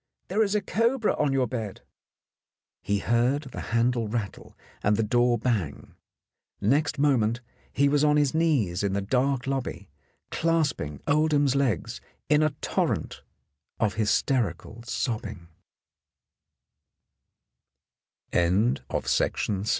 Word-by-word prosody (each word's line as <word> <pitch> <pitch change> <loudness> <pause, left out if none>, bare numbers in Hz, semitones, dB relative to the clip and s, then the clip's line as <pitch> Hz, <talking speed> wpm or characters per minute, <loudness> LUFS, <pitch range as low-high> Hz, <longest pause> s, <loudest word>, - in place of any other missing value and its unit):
There 205 +4 +1
is 210 -1 +1
a 210 - +2
cobra 230 +4 +1
on 145 -2 +1
your 135 -1 +2
bed! 110 -4 -5 0.5
" - - -67 0.3
He 100 - 0
heard 120 +7 +1
the - - -6
handle 115 0 +1
rattle 105 -3 -5 0.2
and 105 +1 +2
the 115 - +2
door 120 +2 +2
bang. 105 - -2 0.7
Next 140 +9 +1
moment 125 -5 +2 0.3
he 140 +2 +2
was 145 +1 +2
on 150 0 +4
his 145 -3 +2
knees 140 - +1
in 100 -1 0
the 100 0 -1
dark 130 +4 0
lobby, 125 - -4 0.4
clasping 155 - 0
Oldham's 145 -2 +2
legs 130 - -1 0.3
in 150 0 +4
a 155 - +3
torrent - - -1 0.6
of 105 -2 +1
hysterical 110 -1 0
so 115 -2 -1
125 Hz, 110 wpm, -26 LUFS, 110-145 Hz, 0.7 s, on